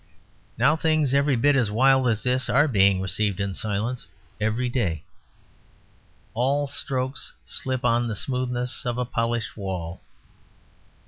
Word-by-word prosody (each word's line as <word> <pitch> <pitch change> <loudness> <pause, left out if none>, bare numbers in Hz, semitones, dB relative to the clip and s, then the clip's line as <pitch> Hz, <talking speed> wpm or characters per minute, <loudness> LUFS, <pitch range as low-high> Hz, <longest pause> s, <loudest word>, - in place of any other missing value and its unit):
Now 150 +3 +4
things 155 -4 +2
every 140 0 +3
bit 145 +4 +3
as 125 -6 +2
wild 130 +4 +4
as 110 -2 0
this 125 +1 +1
are 145 +4 +4
being 100 -6 +3
received 100 +1 -1
in 100 -1 -2
silence 110 +5 -3 0.3
every 110 +4 0
day. 100 - -1 1.3
All 135 +5 +1
strokes 130 -1 -3
slip 130 -3 -2
on 120 +1 +2
the 110 - -3
smoothness 125 +1 -2
of 120 0 -2
a 125 - -1
polished 115 -1 -2
wall. 95 -4 -5
120 Hz, 135 wpm, -24 LUFS, 105-130 Hz, 1.3 s, Now